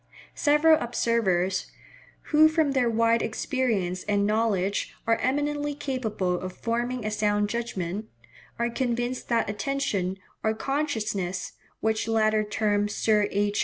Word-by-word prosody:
Several 305 +1 +4
observers, 210 -6 0 0.7
who 310 +1 +8
from 315 -2 +2
their 255 -3 +2
wide 230 0 +3
experience 215 -7 -1
and 205 -1 +1
knowledge 205 -3 0
are 230 0 +3
eminently 290 +3 -1
capable 220 -11 -2
of 185 0 -6
forming 240 0 -2
a 215 - -1
sound 210 -1 +1
judgment, 215 -4 -3 0.5
are 235 0 0
convinced 245 0 -2
that 230 -2 +2
attention 205 -4 -1 0.3
or 220 0 +1
consciousness 215 -10 -2 0.3
(which 220 0 0
latter 215 -1 +2
term 210 -1 0
Sir 210 0 +2
H. 205 0 0
225 Hz, 125 wpm, -26 LUFS, 205-255 Hz, 0.7 s, who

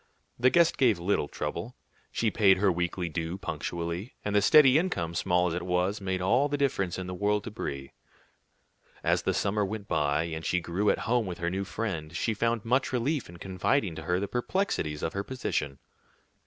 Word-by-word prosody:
The 125 +2 +5
guest 170 +3 +3
gave 120 -7 +4
little 85 -3 0
trouble, - - -5 0.4
she 110 -2 0
paid 100 -3 +5
her 100 0 +3
weekly 90 +1 -2
due 80 +2 -3
punctually, 85 - -4
and 105 0 -1
the 105 - +5
steady 135 +6 +7
income, 85 - -2
small 90 +1 +2
as 90 - 0
it 90 - -2
was, 90 +3 0
made 95 -1 -2
all 125 +9 +3
the 145 - -1
difference 100 -11 0
in 95 - -4
the 90 - -5
world 105 +2 0
to 115 - -6
Brie. 70 -9 -5 1.1
As - - +2
the - - 0
summer 105 +1 +1
went 100 +1 -4
by, 75 -1 +1
and 80 -1 -5
she 90 - +1
grew 90 +5 0
at - - +3
home 115 -2 +1
with 90 - -5
her 85 0 -2
new 95 +1 -2
friend, 85 -7 -4
she 115 - 0
found 115 +1 0
much 130 +3 +1
relief 130 - -1
in 85 - -11
confiding 95 +3 0
to 80 - -7
her 90 +3 0
the 100 - -2
perplexities 120 - -1
of 80 - -2
her 100 - -2
position. 75 - -3
95 Hz, 200 wpm, -28 LUFS, 85-115 Hz, 1.1 s, steady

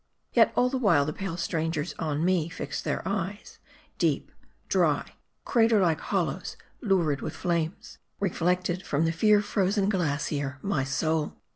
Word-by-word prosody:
Yet - - +5
all 250 - +4
the 260 +1 -1
while, 170 - +4
the 155 - -3
pale 190 -2 -4
strangers 165 -1 -2
on 155 0 -1
me 175 -3 +2
fixed 145 -3 -5
their - - -2
eyes; 200 +1 -4 0.4
deep, - - 0 0.4
dry, - - +1 0.3
crater 225 -3 +4
like 165 -5 +2
hollows, - - -2 0.2
lurid 175 - +1
with - - -5
flames, 170 -1 -2 0.2
reflected 180 -1 0
from 150 +3 0
the 165 - +2
fear 210 +5 +4
frozen 200 0 +1
glacier, 145 -6 -1
my 175 -9 0
soul. 155 +3 -1
170 Hz, 145 wpm, -27 LUFS, 155-195 Hz, 0.4 s, Yet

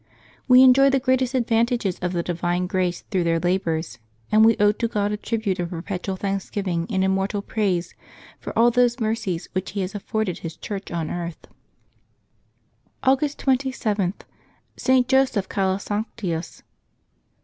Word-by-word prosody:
We 255 0 +8
enjoy 265 +2 +7
the 270 0 +2
greatest 260 0 +1
advantages 235 -4 +1
of 180 0 -2
the 170 -2 -1
divine 175 +1 -1
grace 180 -1 -1
through 185 -3 +1
their 165 0 +1
labors, 170 -4 -1 0.3
and 215 +1 +6
we 225 0 +5
owe 205 0 +5
to 230 +2 -2
God 210 -2 -1
a - - 0
tribute 210 -4 -2
of 175 -1 -2
perpetual 185 +2 -4
thanksgiving 195 -3 -2
and 190 -3 +1
immortal 195 +1 0
praise 190 -6 -1 0.5
for - - -6
all 235 +1 +5
those 245 +1 +2
mercies 215 -6 -2
which 185 0 -3
He 200 - -2
has 185 +2 -3
afforded 205 -2 -2
His 160 -1 -7
Church 200 -1 -6
on 165 -2 -3
earth. 170 -1 -5 1.6
August 270 +2 +2
27.— 250 -8 0 0.6
ST. 255 -2 +2
JOSEPH 260 -7 +2
CALASANCTIUS. 195 -2 -3
200 Hz, 145 wpm, -23 LUFS, 180-235 Hz, 1.6 s, We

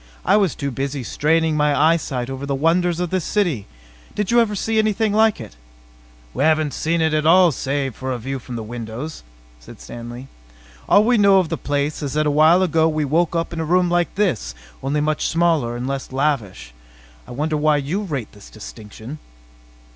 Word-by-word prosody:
"I - - +4
was 195 -7 +2
too 140 0 -3
busy 135 +1 -3
straining 160 +5 +1
my 150 -1 +2
eyesight 145 -6 +1
over 135 +1 -6
the 140 - -1
wonders 170 +4 +1
of 180 -2 -2
this 185 -2 0
city. 165 - -1 0.5
Did 210 -1 -1
you 240 - +5
ever 215 -3 +1
see 220 +3 0
anything 215 0 +1
like 220 0 +3
it?" - - -10 0.8
"We - - -1
haven't 155 -2 +2
seen 165 +3 -1
it 160 -1 +1
at 155 0 +1
all, 180 +1 +6
save 135 -1 -2
for 130 0 -4
a 125 - -2
view 135 +3 -5
from 125 0 -8
the 115 - -4
windows," 120 +6 -7 0.4
said - - -14
Stanley. 120 - -9 0.6
"All 205 - +6
we 240 0 +3
know 200 -1 +6
of 180 -4 +1
the 165 - -1
place 145 0 -2
is 140 -3 -4
that 155 0 +1
a 150 - +2
while 160 +5 +5
ago 160 -2 +2
we 155 -1 -1
woke 165 +4 +1
up 165 +1 -2
in 165 - -4
a - - -1
room 175 +2 +2
like 175 0 0
this, 130 - -1 0.3
only 140 +3 -1
much 155 0 0
smaller 160 -8 +1
and 120 - -4
less 135 -1 -4
lavish. 130 - -2 0.5
I - - -11
wonder 150 +5 -2
why 150 0 +2
you 150 +8 -2
rate 140 - -4
this 105 -2 -15
distinction?" 110 +5 -10
150 Hz, 200 wpm, -20 LUFS, 135-175 Hz, 0.8 s, all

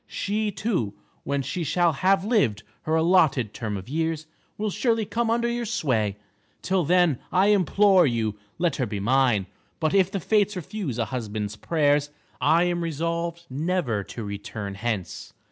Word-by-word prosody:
She 210 +1 -1
too, 180 - -2 0.3
when 140 -1 -1
she 175 +5 -3
shall 170 +2 +2
have 190 +5 +2
lived 200 - +1 0.2
her 155 - +1
allotted 160 - +3
term 105 -4 -3
of 95 - -9
years, 160 +2 -2 0.3
will 215 0 -1
surely 225 0 +1
come 225 +3 -1
under 235 +1 +1
your 235 -1 -2
sway. 115 - 0 0.5
Till 185 -1 +1
then, 175 -4 +3
I 190 +3 +4
implore 195 -2 +4
you, 115 -4 0 0.2
let 170 -4 0
her 130 - 0
be 105 -1 -4
mine. 120 -2 +2 0.3
But 155 -1 0
if 190 -2 +4
the 195 - -3
Fates 210 +2 +2
refuse 180 - -4
a 115 - 0
husband's 110 -3 -4
prayers, 145 +2 +1 0.3
I 165 +2 +4
am 175 -1 0
resolved 170 +1 -2
never 140 - -1
to 115 - -7
return 100 0 -5
hence. 105 -2 -4
160 Hz, 160 wpm, -25 LUFS, 120-190 Hz, 0.5 s, I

